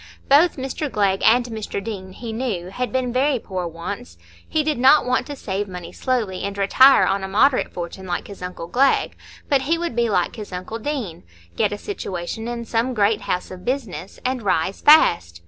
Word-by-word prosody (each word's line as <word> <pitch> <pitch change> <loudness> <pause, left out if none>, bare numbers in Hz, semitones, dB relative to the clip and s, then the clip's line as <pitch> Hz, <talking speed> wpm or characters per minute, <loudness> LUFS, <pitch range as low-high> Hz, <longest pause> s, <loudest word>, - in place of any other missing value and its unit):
Both 300 +5 +5
Mr 270 +2 -4
Glegg 195 -2 +1
and 245 +2 +5
Mr 220 -4 -5
Deane, 195 -3 -7
he 230 +2 -7
knew, 220 -7 -3
had 250 +4 -3
been 255 -2 -1
very 270 +2 +2
poor 185 -5 -4
once; 165 - -7 0.3
he 310 - +1
did 300 -4 -1
not 270 +4 +6
want 250 0 0
to 290 - -6
save 205 -4 -3
money 180 -2 -8
slowly 225 -8 -2
and 200 0 -4
retire 260 +7 +6
on 195 0 0
a - - -3
moderate 255 +7 +2
fortune 180 +2 -7
like 175 - -3
his 200 -2 -11
uncle 180 -2 -6
Glegg, 265 +10 +2 0.3
but 280 -3 +2
he 315 +5 +1
would 340 -8 -3
be 235 -1 +1
like 180 +2 0
his 210 -2 -8
uncle 185 +5 -5
Deane—get 160 - -4
a 205 - -3
situation 205 - -5
in 235 -1 -4
some 235 +3 -1
great 210 0 +2
house 180 +1 -3
of 185 -1 -9
business 200 - -4
and 255 -1 -1
rise 190 -2 0
fast. 85 - +5
215 Hz, 195 wpm, -22 LUFS, 185-255 Hz, 0.3 s, not